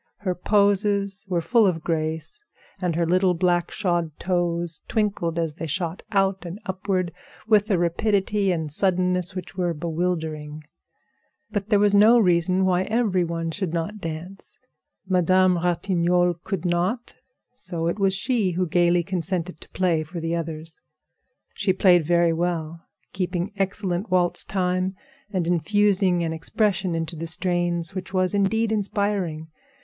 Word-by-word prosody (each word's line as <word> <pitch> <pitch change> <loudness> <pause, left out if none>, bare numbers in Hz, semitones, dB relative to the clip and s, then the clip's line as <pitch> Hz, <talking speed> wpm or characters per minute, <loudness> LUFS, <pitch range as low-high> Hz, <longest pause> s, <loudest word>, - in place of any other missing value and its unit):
Her 185 -3 0
poses 200 +1 +1
were 175 -2 +1
full 220 +5 +4
of 165 -4 -1
grace, 160 - -2 0.4
and 175 -3 0
her 170 0 +1
little 180 +1 +2
black 175 0 +1
shod 175 -5 -1
toes 175 -3 -1
twinkled 200 -7 -1
as 165 -2 -1
they 165 +1 -6
shot 170 +2 -3
out 195 -2 +1
and 175 +3 -7
upward 185 -1 -1 0.4
with 215 -1 +4
a 195 - +3
rapidity 195 +3 +1
and 160 -4 -2
suddenness 180 +1 +1
which 185 +1 -7
were 175 -2 -1
bewildering. 160 -2 -3 0.9
But 205 -1 -3
there 210 - +5
was 205 0 +3
no 215 +4 +7
reason 185 -2 +3
why 185 -1 +2
every 215 -5 +1
one 165 -1 -3
should 175 -2 -3
not 170 +6 -3
dance. 175 +2 -7 0.5
Madame 185 0 +3
Ratignolle 175 0 +1
could 190 -3 -3
not, 180 +8 -1 0.4
so 180 -10 -2
it 170 +5 -1
was 195 -1 +2
she 215 -4 0
who 180 +2 0
gaily 175 +1 +2
consented 180 -1 -2
to - - -13
play 175 -4 +1
for 170 +3 -6
the 165 0 -2
others. 160 -1 -5 0.7
She 200 - +1
played 180 -2 +5
very 170 +1 +3
well, 165 -1 -3 0.3
keeping 180 +1 -2
excellent 195 0 -2
waltz 175 -1 +1
time 185 0 -1 0.3
and 185 -4 -1
infusing 185 +1 +2
an 165 -1 -2
expression 185 +1 0
into 165 0 -3
the 165 +1 -5
strains 175 -1 0
which 185 -1 -6
was 185 0 +2
indeed 220 +3 +1
inspiring. 200 -6 -1
180 Hz, 145 wpm, -24 LUFS, 170-195 Hz, 0.9 s, no